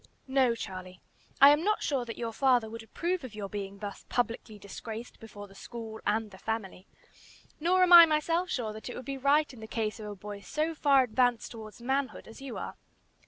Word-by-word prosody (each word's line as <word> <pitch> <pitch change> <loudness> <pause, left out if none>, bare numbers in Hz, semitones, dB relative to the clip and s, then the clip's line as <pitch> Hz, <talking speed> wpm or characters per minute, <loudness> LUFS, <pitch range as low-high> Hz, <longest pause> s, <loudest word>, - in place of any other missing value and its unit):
"No, 260 -3 +3
Charlie; 185 -4 -7 0.4
I 280 +1 +10
am 295 +2 +3
not 425 +2 +1
sure 270 -4 0
that 230 - -7
your 230 -1 -4
father 250 -3 +3
would 230 0 -7
approve 340 +9 -3
of 240 -4 -8
your 205 -2 -4
being 200 -1 -5
thus 200 0 -7
publicly 230 -3 -2
disgraced 220 +3 -8
before 205 -2 -10
the 195 - -17
school 220 +1 -8
and 215 0 0
the 190 - -13
family, 210 -4 -4 0.7
nor 365 +4 +3
am 360 -1 +5
I 340 -1 +12
myself 330 +4 +1
sure 225 -8 -2
that 220 +3 -8
it - - -6
would 255 - -7
be 275 0 -4
right 285 +2 +3
in 245 - -12
the 220 - -8
case 220 0 -2
of 215 - -7
a 205 - -6
boy 205 +1 -8
so 310 +10 -2
far 280 -3 +4
advanced 245 0 +1
towards 220 0 -10
manhood 265 +2 -2
as 225 - -12
you 270 -4 -6
are. - - -6
235 Hz, 210 wpm, -30 LUFS, 215-275 Hz, 0.7 s, I